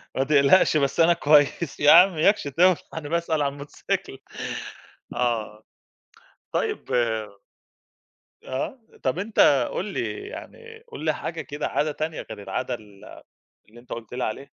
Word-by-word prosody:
ما 135 - +2
تقلقش 150 +4 +4
بس 140 +2 0
أنا 170 +1 +6
كويس، 150 0 +2
يا 145 - +6
عم 180 +2 +8
إياكش 200 +7 +3
تولع 175 +6 +4 0.2
أنا 150 -2 -6
باسأل 165 -2 0
على 140 -1 0
الموتوسيكل 145 +1 -5 1.0
آه، 110 -3 -2 0.9
طيب - - -2
آآ، 115 -2 +1 1.3
آه، 135 - -4 0.2
طَب 130 +7 0
أنت 150 - +3
قُل 190 - -2
لي 385 - -4
يعني 455 -1 -11
قٌل - - -7
لي - - +2
حاجة - - -5
كده 145 -1 -4
عادة 150 +1 0
تانية 155 +2 -4
غير 105 - -8
العادة 125 +3 -3
ال 105 -4 -11 0.6
اللي 120 +2 -15
أنت 120 - -21
قُلت 115 0 -7
لي 125 - -3
عليها. 110 +5 -3
145 Hz, 150 wpm, -24 LUFS, 125-170 Hz, 1.3 s, عم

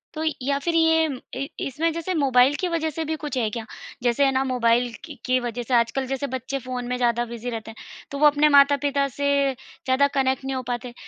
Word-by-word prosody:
तो 315 - -3 0.2
या 280 +2 0
फिर 340 -1 0
ये 320 -1 +4 0.4
इ - - -5 0.2
इसमें 315 +5 -1
जैसे 335 +3 -3
मोबाइल 265 -2 +4
की 370 - 0
वजह 320 -1 0
से 325 - 0
भी 315 - -2
कुछ 290 -3 -3
है 225 -3 +1
क्या? 225 +1 -6 0.4
जैसे 245 +3 +3
है 270 - +3
ना 265 0 +1
मोबाइल 240 0 +2
क 300 -4 -10
की 255 0 +2
वजह 240 +1 -4
से 245 - -4
आजकल 240 +3 +1
जैसे 270 +1 -2
बच्चे 260 +2 -4
फ़ोन 250 -1 -5
में 250 - -1
ज़्यादा 240 -1 +1
बिज़ी 235 +1 -5
रहते 225 -1 -6
हैं। 220 - -17 0.3
तो 280 - -4
वो 300 - +7
अपने 295 +1 +4
माता-पिता 280 0 +4
से 285 0 0 0.3
ज़्यादा 260 +2 -1
कनेक्ट 265 0 +1
नहीं 270 0 -2
हो 255 - -2
पाते, 245 0 -4
265 Hz, 230 wpm, -24 LUFS, 245-285 Hz, 0.4 s, वो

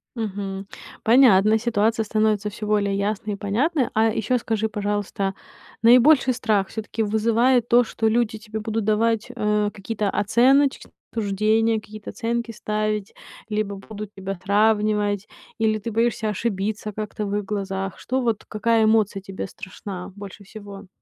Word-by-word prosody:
Мгм. 200 -3 -4 0.4
Понятно, 220 -3 +6
ситуация 220 -1 +1
становится 215 -1 +1
всё 210 +1 -7
более 200 -2 +1
ясной 210 +1 -2
и - - -3
понятной. 245 - 0
А 220 +1 +3
ещё 225 +2 0
скажи, 220 -2 -1
пожалуйста, 205 -2 -2 0.5
наибольший 255 +3 +6
страх 215 -5 0
всё-таки 220 0 -3
вызывает 230 +3 +2
то, 240 +1 +5
что 225 -1 -1
люди 225 0 +1
тебе 215 0 -6
будут 220 0 -2
давать, 220 +1 +1
э, 210 -2 +1
какие-то 210 0 -3
оценочные 265 +8 +2 0.2
суждения, 220 +1 +1
какие-то 215 0 -10
оценки 235 0 -2
ставить, 215 -1 -2 0.4
либо 210 -1 -2
будут 210 +1 -9
тебя 195 0 -5
сравнивать, 210 0 +2 0.3
или 220 -1 +1
ты 230 +3 -5
боишься 230 0 0
ошибиться 210 0 -2
как-то 215 0 -4
в 200 0 -2
их 205 - -1
глазах? 195 -1 -3
Что, 260 +1 -1
вот 230 -4 -1
какая 225 +1 +2
эмоция 215 -2 +2
тебе 195 0 -6
страшна 185 0 -8
больше 200 0 -10
всего? 200 -1 -10
215 Hz, 145 wpm, -23 LUFS, 205-225 Hz, 0.5 s, Понятно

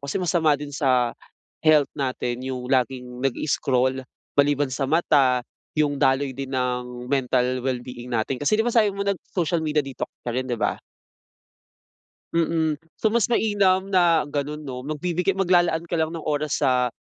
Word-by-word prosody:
kasi 140 0 -4
masama 170 -5 +2
din 145 0 -8
sa 130 -4 +2 0.5
health 155 -3 +4
natin 125 -3 -3
'yung 130 -1 -4
laging 125 -1 -1
nag-i-scroll, 130 -1 0 0.3
maliban 145 -1 +2
sa 135 +1 -1
mata, 140 -6 +3 0.3
'yung 145 -2 +1
daloy 135 +1 +2
din 135 +1 -6
ng 125 -1 -2
mental 125 -1 +1
well-being 125 -1 -4
natin. 120 +2 -1
Kasi 145 +9 +2
di 220 - +1
ba, 240 - 0
sabi 220 -3 +4
mo 200 - -2
nag-social 180 -3 -1
media 150 -2 0
detox 135 -1 -5 0.2
ka 120 - -2
rin, 130 +2 -2
di 120 - -1
ba? - - -1 1.5
Mm, 160 -2 +1 0.2
so 220 - +1
mas 235 0 +2
mainam 200 -4 +2
na 170 -4 +4
gano'n 145 +1 -3
'no, 130 -3 -5
magbibigay 170 +7 -1
maglalaan 175 -3 +2
ka 170 -1 -2
lang 160 - +1
ng 160 - -7
oras 150 0 -1
sa 125 -2 +3
145 Hz, 160 wpm, -24 LUFS, 130-165 Hz, 1.5 s, health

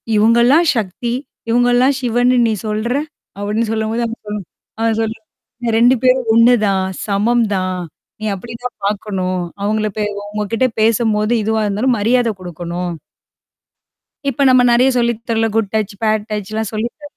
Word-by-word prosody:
இவுங்கலாம் 235 +9 +4
சக்தி, 220 +3 -3 0.4
இவங்கலாம் 245 +3 +3
சிவன்னு 245 +1 +2
நீ 220 - +1
சொல்ற! 215 +3 -1 0.4
அப்டின்னு 210 +2 -1
சொல்லும்போது 220 +2 -1
அவ 225 - -5
சொல்லம்போது 210 -4 -5 0.3
ஆ - - +1 0.2
சொல்லுங்க. 220 0 -4 0.5
2 245 +2 +5
பேரும் 255 -2 +3
ஒண்ணுதான். 215 -5 +4 0.2
சமம் 225 +4 +2
தான். 185 -1 -2 0.4
நீ - - -3
அப்டிதான் 235 +4 -7
பார்க்கணும். 190 -3 -2 0.2
அவங்கள 215 +1 0
பே 210 - 0 0.2
அவுங்ககிட்ட 210 +4 -1
பேசும்போது 220 0 +2
இதுவா 220 +1 0
இருந்தாலும் 235 +5 +1
மரியாத 235 +2 +2
குடுக்கணும். 175 0 -5 1.4
இப்ப 275 - -3
நம்ம 255 -1 +6
நெறைய 250 +3 +4
சொல்லி 235 -1 +2 0.2
தரல. 225 0 +2
Good 220 -3 0
touch, 215 -1 -1
bad 215 -1 +1
டச்லாம் 215 +1 -3
சொல்லித்த 235 +7 -4
220 Hz, 135 wpm, -17 LUFS, 210-240 Hz, 1.4 s, நம்ம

